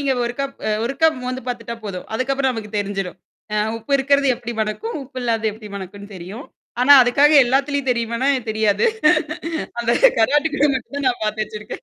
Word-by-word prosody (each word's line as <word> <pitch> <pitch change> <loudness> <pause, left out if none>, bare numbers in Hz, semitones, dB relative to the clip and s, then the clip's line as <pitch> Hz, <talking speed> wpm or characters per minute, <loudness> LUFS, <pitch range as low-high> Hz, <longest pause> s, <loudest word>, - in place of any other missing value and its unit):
நீங்க 280 -1 +1
ஒருக்கப் 275 +3 -4 0.3
ஒருக்கப் 315 +4 +2
மோந்து 255 0 -4
பார்த்துட்டா 235 -1 -4
போதும். 185 -3 -5
அதுக்கப்புறம் 265 +1 0
நமக்கு 215 -3 -7
தெரிஞ்சிடும். 195 -3 -4 0.4
அ - - 0 0.2
உப்பு 230 +5 -7
இருக்கிறது 280 +1 +2
எப்படி 240 0 -6
மனக்கும், 220 - -3
உப்பு 260 0 -9
இல்லாத 225 -2 -1
எப்படி 215 0 -11
மனக்குன்னு 200 +2 -9
தெரியும். 190 +9 -8 0.4
ஆனா 285 +3 +7
அதுக்காக 280 +5 +4
எல்லாத்துலயும் 275 +1 0
தெரியுமனா 235 +3 -1 0.2
தெரியாது. 215 - +2 0.9
அந்த 235 0 0 0.3
கருவாட்டுக்கு 295 +5 +2
மட்டும் 260 +2 -5
தான் 285 -2 -2
நான் 240 -3 -2
பார்த்து 215 0 -1
வச்சிருக்கேன். 210 0 -9
240 Hz, 155 wpm, -20 LUFS, 215-275 Hz, 0.9 s, ஆனா